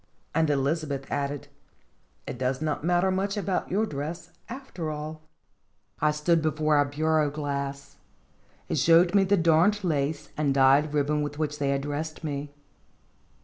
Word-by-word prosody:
And 160 Hz, 0 st, +2 dB
Elizabeth 140 Hz, 0 st, -1 dB
added: 140 Hz, 0 st, -2 dB, 0.8 s
"It 125 Hz, -, -6 dB
does 130 Hz, 0 st, 0 dB
not 155 Hz, -1 st, -2 dB
matter 175 Hz, +2 st, +2 dB
much 195 Hz, +2 st, -1 dB
about 190 Hz, -2 st, -1 dB
your 210 Hz, +4 st, +1 dB
dress, 165 Hz, +2 st, -6 dB, 0.2 s
after 235 Hz, -, -6 dB
all! 155 Hz, +1 st, -6 dB, 0.4 s
" -, -, -41 dB
I 150 Hz, -, +4 dB
stood 150 Hz, +2 st, +2 dB
before 155 Hz, -1 st, +1 dB
our 145 Hz, -, +4 dB
bureau 155 Hz, +1 st, +1 dB
glass. 140 Hz, -1 st, -4 dB, 0.7 s
It -, -, -1 dB
showed 165 Hz, +5 st, +5 dB
me 200 Hz, -1 st, +5 dB
the 200 Hz, +1 st, +3 dB
darned 170 Hz, +5 st, +3 dB
lace 150 Hz, -2 st, -1 dB
and 145 Hz, -3 st, +1 dB
dyed 140 Hz, +3 st, +4 dB
ribbon 150 Hz, +1 st, +1 dB
with 145 Hz, 0 st, -4 dB
which 150 Hz, -1 st, -2 dB
they 140 Hz, -1 st, 0 dB
had 140 Hz, 0 st, +1 dB
dressed 155 Hz, +3 st, -4 dB
me. 145 Hz, -1 st, -4 dB
150 Hz, 155 wpm, -27 LUFS, 145-165 Hz, 0.8 s, showed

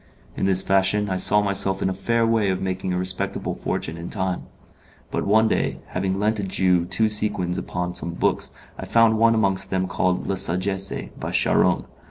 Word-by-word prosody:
In -, -, -1 dB
this 95 Hz, -1 st, +3 dB
fashion 95 Hz, +1 st, +1 dB
I 95 Hz, -, 0 dB
saw 105 Hz, +3 st, +5 dB
myself 100 Hz, -1 st, +1 dB
in -, -, +1 dB
a 95 Hz, -, -1 dB
fair 115 Hz, +5 st, 0 dB
way 115 Hz, -3 st, +2 dB
of 95 Hz, -1 st, -1 dB
making 95 Hz, 0 st, -3 dB
a 90 Hz, -, -1 dB
respectable 95 Hz, +2 st, -3 dB
fortune 80 Hz, +2 st, -4 dB
in 85 Hz, -, -7 dB
time; 95 Hz, -3 st, -3 dB, 0.6 s
but -, -, -2 dB
one, 110 Hz, +2 st, +4 dB
day, -, -, -1 dB
having 95 Hz, +1 st, -2 dB
lent 105 Hz, +2 st, 0 dB
a -, -, -2 dB
Jew 90 Hz, -2 st, +1 dB
two 100 Hz, +5 st, +1 dB
sequins 105 Hz, -4 st, +1 dB
upon 90 Hz, 0 st, -4 dB
some 85 Hz, -1 st, -4 dB
books, -, -, 0 dB, 0.3 s
I -, -, -5 dB
found 115 Hz, -1 st, +3 dB
one 115 Hz, 0 st, +4 dB
amongst 95 Hz, -3 st, +1 dB
them 95 Hz, -1 st, 0 dB
called 90 Hz, 0 st, -1 dB
'La 100 Hz, -, -2 dB
Sagesse,' 95 Hz, +3 st, -1 dB
by -, -, -4 dB
Charron. -, -, +2 dB
95 Hz, 195 wpm, -23 LUFS, 90-105 Hz, 0.6 s, saw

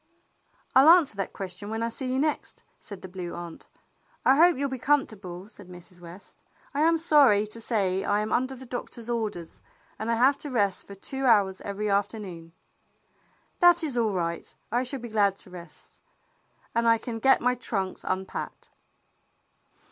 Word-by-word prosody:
"I'll 270 Hz, +4 st, +7 dB
answer 335 Hz, -, +6 dB
that 195 Hz, -, -3 dB
question 195 Hz, +1 st, -6 dB
when 225 Hz, +1 st, -2 dB
I 230 Hz, -, 0 dB
see 255 Hz, +2 st, -4 dB
you 260 Hz, -, 0 dB
next," 300 Hz, +2 st, -2 dB, 0.2 s
said 200 Hz, -3 st, -10 dB
the -, -, -6 dB
Blue 180 Hz, -2 st, -7 dB
Aunt. 170 Hz, -1 st, -9 dB, 0.6 s
"I 265 Hz, -, +6 dB
hope 340 Hz, +1 st, +5 dB
you'll 280 Hz, +1 st, 0 dB
be 260 Hz, -1 st, -5 dB
comfortable," 205 Hz, -10 st, -1 dB
said 200 Hz, -3 st, -15 dB
Mrs. 180 Hz, 0 st, -13 dB
West. 175 Hz, +3 st, -13 dB, 0.3 s
"I 285 Hz, -, 0 dB
am 330 Hz, +1 st, +4 dB
sorry 285 Hz, -10 st, +4 dB
to 215 Hz, +2 st, -5 dB
say 195 Hz, -5 st, 0 dB
I 205 Hz, +1 st, +1 dB
am 215 Hz, 0 st, -2 dB
under 260 Hz, +2 st, 0 dB
the 260 Hz, +1 st, -11 dB
doctor's 240 Hz, -1 st, -5 dB
orders, 210 Hz, -8 st, -4 dB, 0.4 s
and 220 Hz, -, -3 dB
I 230 Hz, -, +2 dB
have 260 Hz, +4 st, +3 dB
to 295 Hz, -, -6 dB
rest 205 Hz, -7 st, 0 dB
for 200 Hz, -, -10 dB
two 265 Hz, +7 st, -4 dB
hours 200 Hz, -5 st, +3 dB
every 205 Hz, +1 st, -4 dB
afternoon." 200 Hz, -4 st, -2 dB, 1.1 s
"That 350 Hz, -1 st, +6 dB
is 290 Hz, -5 st, -1 dB
all 225 Hz, -4 st, +1 dB
right. 170 Hz, -2 st, -3 dB, 0.2 s
I 240 Hz, +2 st, +1 dB
shall 265 Hz, +2 st, -1 dB
be 240 Hz, 0 st, -8 dB
glad 205 Hz, -3 st, +2 dB
to 190 Hz, -, -12 dB
rest, 175 Hz, -3 st, -13 dB, 0.7 s
and 235 Hz, 0 st, +1 dB
I 230 Hz, 0 st, +5 dB
can 225 Hz, 0 st, -6 dB
get 265 Hz, +4 st, +5 dB
my 250 Hz, +1 st, +2 dB
trunks 195 Hz, -6 st, -3 dB
unpacked." 190 Hz, 0 st, -5 dB
220 Hz, 180 wpm, -27 LUFS, 190-260 Hz, 1.1 s, I'll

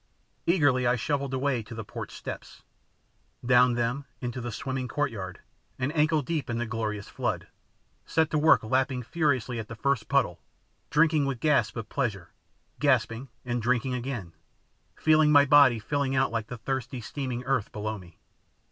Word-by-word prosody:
Eagerly 145 Hz, -8 st, +3 dB
I 120 Hz, -, +3 dB
shuffled 140 Hz, +2 st, -1 dB
away 130 Hz, -2 st, 0 dB
to 115 Hz, +2 st, -10 dB
the 110 Hz, -, -5 dB
porch -, -, -7 dB
steps, -, -, -8 dB, 0.8 s
down 125 Hz, 0 st, +5 dB
them 120 Hz, +4 st, -1 dB
into 125 Hz, 0 st, -4 dB
the 120 Hz, 0 st, -4 dB
swimming 130 Hz, +2 st, -3 dB
courtyard, 110 Hz, -11 st, -3 dB, 0.4 s
and 140 Hz, +5 st, -2 dB
ankle 155 Hz, 0 st, +3 dB
deep 150 Hz, -3 st, -3 dB
in 115 Hz, -, -1 dB
the 120 Hz, -, -1 dB
glorious 110 Hz, -3 st, -3 dB
flood, -, -, -3 dB, 0.6 s
set 160 Hz, 0 st, +1 dB
to 155 Hz, -, +2 dB
work 160 Hz, -3 st, +5 dB
lapping 130 Hz, +2 st, 0 dB
furiously 130 Hz, -5 st, 0 dB
at 110 Hz, -, -6 dB
the 115 Hz, -, -8 dB
first 130 Hz, -1 st, 0 dB
puddle, -, -, +1 dB, 0.5 s
drinking 155 Hz, -2 st, +3 dB
with 135 Hz, -3 st, -2 dB
gasps 130 Hz, -9 st, +2 dB
of 115 Hz, -2 st, -5 dB
pleasure, 105 Hz, -, -2 dB, 0.5 s
gasping 130 Hz, -2 st, +1 dB, 0.2 s
and 120 Hz, -1 st, -1 dB
drinking 125 Hz, +2 st, +1 dB
again, 120 Hz, -9 st, -4 dB, 0.6 s
feeling 155 Hz, -1 st, +4 dB
my 145 Hz, -1 st, +7 dB
body 140 Hz, -4 st, +6 dB
filling 135 Hz, +4 st, -1 dB
out 130 Hz, -1 st, +2 dB
like 115 Hz, -2 st, -2 dB
the 125 Hz, -, -6 dB
thirsty 130 Hz, +1 st, -3 dB
steaming 125 Hz, +1 st, -4 dB
earth 130 Hz, -4 st, 0 dB
below 110 Hz, 0 st, -4 dB
me. 85 Hz, -3 st, -16 dB
125 Hz, 165 wpm, -27 LUFS, 115-140 Hz, 0.8 s, my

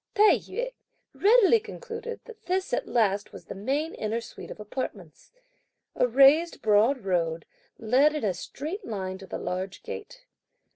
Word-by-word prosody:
Tai 425 Hz, +1 st, +7 dB
yü -, -, -4 dB, 0.4 s
readily 450 Hz, +1 st, +5 dB
concluded 460 Hz, +1 st, -7 dB
that 450 Hz, -2 st, -14 dB
this 370 Hz, +1 st, -1 dB
at -, -, 0 dB
last 205 Hz, -4 st, +1 dB
was -, -, -11 dB
the -, -, -7 dB
main 275 Hz, -, -2 dB
inner 220 Hz, +2 st, -2 dB
suite 230 Hz, -, -10 dB
of -, -, -9 dB
apartments. 210 Hz, -, -7 dB, 0.6 s
A 250 Hz, -, +3 dB
raised 275 Hz, +7 st, +5 dB
broad 220 Hz, +3 st, +3 dB
road 165 Hz, -3 st, 0 dB, 0.3 s
led 265 Hz, +7 st, +3 dB
in 300 Hz, -, -3 dB
a 200 Hz, -3 st, +1 dB
straight 320 Hz, -, -6 dB
line 190 Hz, -, -4 dB
to 195 Hz, -, -11 dB
the -, -, -4 dB
large 185 Hz, +1 st, -4 dB
gate. 475 Hz, +2 st, -8 dB
265 Hz, 155 wpm, -27 LUFS, -, 0.6 s, Tai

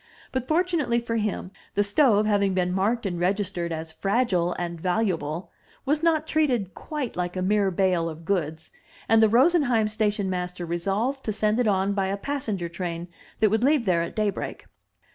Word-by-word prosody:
But, 260 Hz, -1 st, -2 dB
fortunately 315 Hz, -8 st, +1 dB
for 230 Hz, -1 st, -2 dB
him, 210 Hz, -3 st, -2 dB, 0.2 s
the 205 Hz, -, +3 dB
stove, 210 Hz, 0 st, +3 dB
having 200 Hz, -2 st, +2 dB
been 180 Hz, -1 st, +1 dB
marked 215 Hz, +5 st, 0 dB
and 175 Hz, -3 st, -2 dB
registered 185 Hz, -2 st, -1 dB
as 160 Hz, 0 st, -5 dB
"fragile 195 Hz, -2 st, +1 dB
and 170 Hz, -2 st, -4 dB
valuable," 175 Hz, -4 st, -1 dB, 0.3 s
was 295 Hz, +2 st, +1 dB
not 320 Hz, -2 st, +2 dB
treated 255 Hz, -, 0 dB
quite 295 Hz, -6 st, -5 dB
like 180 Hz, 0 st, -3 dB
a 185 Hz, -, -1 dB
mere 200 Hz, +1 st, +2 dB
bale 180 Hz, -2 st, +1 dB
of 160 Hz, +1 st, -9 dB
goods, 160 Hz, -4 st, -2 dB, 0.4 s
and 225 Hz, 0 st, +5 dB
the 220 Hz, -, +5 dB
Rosen 295 Hz, +10 st, +5 dB
heim 235 Hz, -6 st, +2 dB
station 210 Hz, -2 st, 0 dB
master 180 Hz, -1 st, -3 dB
resolved 200 Hz, +11 st, -1 dB
to 215 Hz, -, 0 dB
send 215 Hz, +2 st, +1 dB
it 245 Hz, -, +2 dB
on 195 Hz, 0 st, +2 dB
by 195 Hz, -1 st, 0 dB
a 195 Hz, +1 st, -2 dB
passenger 215 Hz, -8 st, -3 dB
train 170 Hz, 0 st, -5 dB, 0.3 s
that 215 Hz, -2 st, +4 dB
would 220 Hz, +2 st, +1 dB
leave 280 Hz, -2 st, +3 dB
there 175 Hz, -3 st, +2 dB
at 170 Hz, -, -4 dB
daybreak. 210 Hz, -3 st, -2 dB
200 Hz, 180 wpm, -25 LUFS, 180-235 Hz, 0.4 s, and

